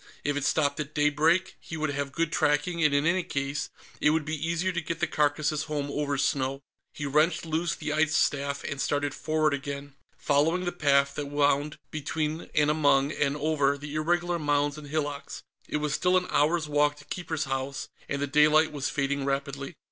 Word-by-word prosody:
If 145 0 0
it 145 - -1
stopped 145 +1 +1
at 150 0 -5
daybreak, 155 +5 +2
he 160 - -7
would 155 -1 -1
have 140 0 -3
good 165 +3 -1
tracking, 160 +3 +1
and 150 - +5
in 140 +1 +2
any 180 +3 +3
case, 140 -3 -3 0.3
it 150 - +4
would 155 -1 +1
be 155 +1 -2
easier 170 +3 0
to 175 -1 -2
get 165 0 -4
the 175 - +2
carcasses 150 0 0
home 145 -2 -3
over 145 -1 -1
snow. 135 0 0 0.3
He 145 - -6
wrenched 155 +5 +2
loose 160 0 -1
the 150 0 -3
ice 155 0 +2
staff 140 0 +1
and 140 -2 -4
started 145 -1 0
forward 155 -1 +1
again, 140 0 -5 0.2
following 160 +5 +2
the 175 - 0
path 140 -4 +2
that 145 0 -4
wound 145 +1 +1
between 155 +1 -3
and 150 0 +4
among 145 -2 +3
and 150 -1 0
over 145 -2 +1
the 145 +1 -8
irregular 175 +3 0
mounds 145 -1 +1
and 150 -1 -9
hillocks. 145 -1 -4 0.3
It - - 0
was 150 -1 -1
still 180 +4 +3
an 180 - 0
hour's 155 +2 +2
walk 145 0 +2
to 145 -1 -15
Keeper's 160 -3 -3
House, 135 0 -3 0.2
and 140 - -1
the 145 - 0
daylight 150 +2 +4
was 145 -3 -2
fading 140 -1 -1
rapidly. 140 +2 -3
150 Hz, 195 wpm, -27 LUFS, 140-155 Hz, 0.3 s, and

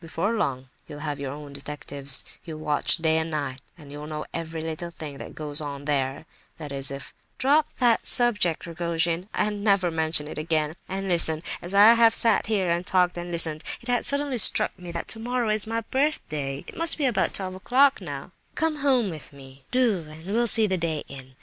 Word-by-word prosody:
Before 170 +6 -2
long, 130 - -2 0.2
you'll 145 0 -9
have 145 -1 -4
your 140 -2 -4
own 145 0 -9
detectives, 140 -1 +1 0.2
you'll 160 -3 -8
watch 150 0 +1
day 160 -1 +1
and 160 0 -3
night, 140 -4 -4 0.2
and 145 -4 -14
you'll 145 +1 -8
know 155 0 -5
every 165 -1 -5
little 160 +2 -5
thing 150 -4 -9
that - - -9
goes 150 -1 0
on 140 -1 -6
there—that 145 +2 -5
is, 135 -1 -2
if—" 140 0 -8 0.2
"Drop 290 +3 +3
that 240 -3 +2
subject, 205 -9 +3
Rogojin, 170 +2 -1
and 210 -1 -1
never 195 -4 +2
mention 160 -2 +1
it 150 - -7
again. 155 -1 -1 0.2
And 195 +1 -4
listen: 165 -3 +4 0.2
as 180 +3 -5
I 210 +3 +8
have 230 -1 +4
sat 225 -3 +3
here, 195 -5 0
and 170 +1 0
talked, 180 -1 +2
and 175 0 -6
listened, 160 -2 0 0.2
it 240 - -9
has 245 0 0
suddenly 280 -3 0
struck - - +6
me 175 -1 -8
that 170 0 -5
tomorrow 235 +1 -1
is 215 0 +3
my 225 +1 -2
birthday. 155 - -2
It - - -9
must 330 0 +4
be 295 - 0
about 245 -5 0
twelve 185 -1 -4
o'clock, 260 +9 +2
now; - - -7 0.2
come 320 -1 0
home 260 -8 +1
with 155 -3 -9
me—do, 145 - -2
and 160 +2 -12
we'll 230 +5 0
see 225 0 +3
the 190 -3 -1
day 160 -3 -2
in! 130 -1 -12
170 Hz, 200 wpm, -25 LUFS, 150-215 Hz, 0.2 s, I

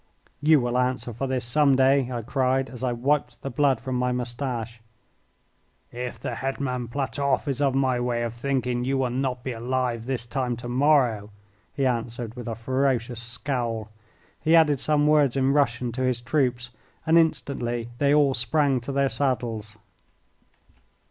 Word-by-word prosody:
"You 155 0 +5
will 125 0 0
answer 125 -1 -1
for 135 +5 -3
this 130 -2 -1
some 140 +2 +3
day," 135 0 +3
I 120 -2 -3
cried, 130 +1 0
as 125 0 -8
I 125 - +1
wiped 125 0 0
the 135 - -4
blood 135 -1 +2
from 130 0 -3
my 125 0 +1
moustache. 120 -2 -4 1.1
"If 125 0 -5
the - - -4
Hetman 130 -2 -3
Platoff 135 +3 -1
is 140 0 -1
of 135 -2 +2
my 130 -2 +2
way 120 -1 -1
of 115 -1 -3
thinking 125 -1 -1
you 135 +2 0
will 130 -2 0
not 125 -1 -2
be 130 - -3
alive 120 0 -2
this 125 -3 -2
time 125 -1 -2
to 120 - -7
morrow," 125 -5 +2 0.5
he 135 - 0
answered, 120 -2 -2
with 120 -1 -8
a 115 - -3
ferocious 125 0 -1
scowl. 120 -3 -3 0.5
He 160 +2 +3
added 150 -4 +5
some 150 +1 +2
words 150 -4 +3
in 135 +1 +2
Russian 125 -4 +1
to 130 +3 -4
his 130 -2 +1
troops, 125 -2 -1 0.3
and 160 - +3
instantly 120 -7 +1
they 140 -1 +3
all 145 -2 +4
sprang 130 +2 +1
to 125 - -5
their 140 0 +2
saddles. 115 -6 -2
125 Hz, 170 wpm, -25 LUFS, 120-135 Hz, 1.1 s, You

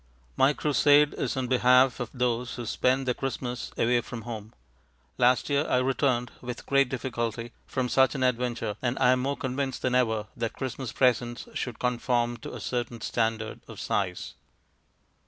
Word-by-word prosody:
My 135 +2 +4
crusade 145 0 +4
is - - -2
on 130 - 0
behalf 125 +1 +4
of 125 - -3
those 125 -1 -1
who 120 - -5
spend 130 +4 +1
their 125 - +1
Christmas 125 -1 -4
away 120 +1 +3
from 120 -1 -8
home. 110 -2 -7 0.7
Last 125 +1 +4
year 145 +1 +1
I - - +3
returned 125 -1 +1
(with 125 -1 -6
great 140 -2 +3
difficulty) 120 -3 -3 0.2
from 130 -2 -1
such 130 +2 +3
an 130 - -1
adventure 120 -4 -1
and 125 0 -1
I 125 - +4
am 130 - +3
more 140 +2 -1
convinced 130 0 -3
than 130 - +1
ever 110 -4 +2
that 115 -1 -3
Christmas 130 -2 -5
presents 120 -1 +1
should 120 -3 -4
conform 120 -1 0
to 115 - -8
a - - -6
certain 120 -1 -3
standard 110 -1 -1
of - - -10
size. 95 -3 -2
125 Hz, 170 wpm, -27 LUFS, 120-130 Hz, 0.7 s, My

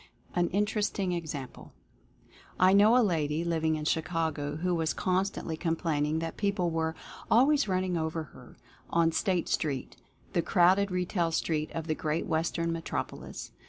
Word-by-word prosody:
AN 175 -1 +2
INTERESTING 205 -1 0
EXAMPLE. 155 -6 -5 0.9
I 185 +1 +6
know 210 +4 +6
a 245 - +5
lady, 160 -3 0
living 160 -2 +1
in 155 -1 -4
Chicago, 160 -2 -1
who 180 +3 -1
was 165 -1 0
con 185 0 +1
stantly 165 -5 -5
complaining 160 -3 0
that 165 0 -4
people 200 -4 0
were 160 0 -1 0.3
"always 275 +3 +4
running 185 -1 0
over 160 0 -2
her" 125 - -15 0.3
on 165 -1 +3
State 180 0 0
Street 140 -5 -2 0.4
(the 170 - +2
crowded 190 +3 +4
retail 180 -2 0
street 155 -1 -1
of 165 -1 -4
the 155 - 0
great 155 +1 -2
Western 165 +1 -1
metropolis). 165 0 -5
165 Hz, 150 wpm, -29 LUFS, 160-185 Hz, 0.9 s, I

